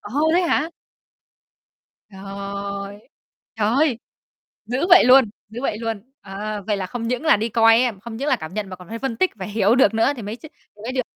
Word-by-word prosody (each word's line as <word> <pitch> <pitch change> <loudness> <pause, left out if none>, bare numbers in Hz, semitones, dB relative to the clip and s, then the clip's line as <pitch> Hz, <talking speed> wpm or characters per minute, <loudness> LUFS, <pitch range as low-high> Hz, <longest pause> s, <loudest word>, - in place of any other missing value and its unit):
Ồ, 290 +9 0
thế 360 - +4
hả? 330 -1 0 1.4
Trời, 200 +1 -7 0.5
trời 210 -2 0
ơi! 270 +1 +2 0.7
Dữ 255 - -1
vậy 355 +1 +8
luôn, 255 -2 +6 0.2
dữ 230 +3 -7
vậy 240 -6 -1
luôn. 225 -3 -3 0.2
Ờ, 205 +1 -6
vậy 210 - 0
là 190 - -3
không 230 +5 -5
những 250 +5 -2
là 315 - +5
đi 225 +2 -2
coi 225 +1 +5
á 245 -3 0
không 230 0 -8
những 280 - -3
là - - +3
cảm 160 +3 -9
nhận 210 -2 -4
mà 185 - -7
còn 180 -1 -15
phải 230 - -5
phân 265 -3 -3
tích 370 +11 +1
và 190 -3 -6
hiểu 210 +1 +2
được 260 - +4
nữa 225 +5 +2
thì 240 - -8
mới 210 +1 -5
ch - - -22
thì 215 -8 -16
mới 240 - -3
được. 255 0 0
225 Hz, 220 wpm, -21 LUFS, 200-255 Hz, 1.4 s, vậy